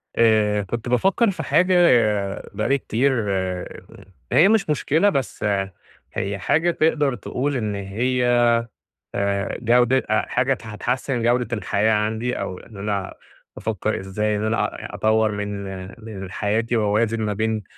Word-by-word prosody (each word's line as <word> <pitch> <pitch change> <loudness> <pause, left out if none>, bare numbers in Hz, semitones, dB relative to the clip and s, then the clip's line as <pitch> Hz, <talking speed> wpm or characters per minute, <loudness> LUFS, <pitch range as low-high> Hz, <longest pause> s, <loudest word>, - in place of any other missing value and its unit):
آآ، 110 -2 +3
كنت 115 +5 -4
بافكّر 195 - +3
في 165 -4 -5
حاجة 175 +7 +3 0.8
بقى 105 +4 -2
لي 140 - +4
كتير 135 +1 0 1.2
هي 170 - +6
مش 215 -6 +2
مشكلة، 155 +6 +2
بس 135 - -2 0.7
هي 100 +1 -2
حاجة 165 - +2
تقدر 150 -5 +1
تقول 135 +6 -3
إن 105 -4 -2
هي 120 +4 +1 0.7
آآ، 100 0 -1
جودة 120 +2 +4
آآ، 110 - +2
حاجة 130 +2 +1
هت 125 - -9
هتحسِّن 120 +3 -2
جودة 120 0 +1
الحياة 105 +2 +1
عندي 110 +3 -1
أو 95 -2 -4
إن 110 - -14
أنا 100 -1 -3 0.4
بافكّر 110 0 -2
إزاي 105 +3 -1
إن 105 - -3
أنا 110 +1 +1 0.3
أ - - -7
أطوّر 110 0 +2
من 105 -1 -4 0.4
من 95 -4 -7
حياتي 110 +4 -1
وأوازن 110 +1 +1
ما 105 -1 -1
بين 110 +1 -1
110 Hz, 140 wpm, -22 LUFS, 105-130 Hz, 1.2 s, هي